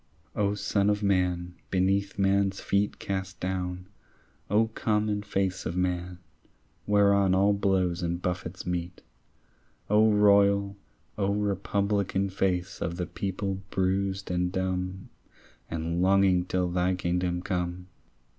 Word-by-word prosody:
O 100 0 +1
son 100 -1 +1
of 105 0 0
man, 90 -3 +1 0.2
beneath 95 +2 +1
man's 100 0 +2
feet 100 +1 0
Cast 95 -1 -4
down, 90 0 -3 0.6
O 110 +2 +3
common 105 -2 0
face 95 -3 -1
of 85 - -3
man 90 -1 -1 0.7
Whereon 100 -2 +4
all 100 +2 +4
blows 95 -3 +1
and 85 0 -2
buffets 90 0 -4
meet, 90 0 -4 0.9
O 110 +1 +5
royal, 100 -1 +4 0.4
O 100 0 +1
republican 100 -1 0
Face 95 -1 -1
of 85 +1 -2
the 90 - -2
people 95 0 -3
bruised 95 0 -1
and 90 0 0
dumb 95 0 -3 0.6
And 85 +1 -2
longing 95 -1 +4
till 90 -1 -1
thy 90 +1 +1
kingdom 90 0 -1
come! 90 -1 -3
95 Hz, 120 wpm, -28 LUFS, 90-100 Hz, 0.9 s, O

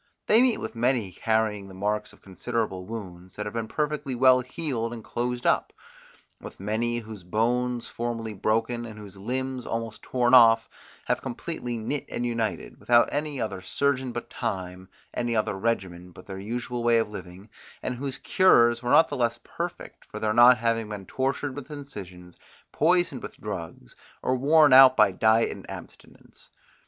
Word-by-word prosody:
They 220 +2 +5
meet 255 -2 +3
with - - -6
many 120 -4 0
carrying 110 0 -1
the 95 - -12
marks 105 +2 -2
of - - -21
considerable 95 -1 -3
wounds, 95 -5 -8
that 105 - -4
have 105 - -5
been 115 -1 -3
perfectly 150 -1 -2
well 130 +1 +6
healed 125 -3 -3
and 115 -2 -8
closed 120 +2 -3
up; - - +2 0.7
with - - -11
many, 110 +4 -1
whose 110 -4 -8
bones 120 +5 0
formerly 115 -2 -4
broken, 115 +4 0
and 110 -2 -9
whose 105 -2 -11
limbs 130 +5 -3
almost 115 -2 -4
torn 125 -1 0
off, 115 -2 +7 0.4
have - - 0
completely 120 -1 -4
knit 130 +6 -3
and 120 - -3
united, 115 -2 -3
without 120 0 +4
any 145 -1 -2
other 100 -5 -3
surgeon 130 +6 -1
but 120 0 -5
time, 95 -5 -4 0.2
any 120 -1 -1
other 110 - 0
regimen 95 -4 -2
but 90 +1 -14
their 95 -1 -7
usual 120 +3 -4
way 120 0 +4
of 115 -2 0
living, 95 +1 -10 0.3
and - - -2
whose 135 0 -4
cures 120 -11 +4
were 120 - -3
not 160 - +6
the 145 - -5
less 120 -1 0
perfect - - -6
for - - -9
their 110 0 0
not 120 +2 +7
having 115 -1 -1
been 100 -2 -6
tortured 135 +4 -2
with 145 0 -8
incisions, 95 - -10 0.3
poisoned 165 -4 +2
with - - -9
drugs, 85 -11 -7 0.3
or 130 - +1
worn 145 +2 +5
out 130 0 +9
by 105 -2 +5
diet 110 +4 +3
and - - -10
abstinence. - - -12
115 Hz, 170 wpm, -26 LUFS, 105-125 Hz, 0.7 s, out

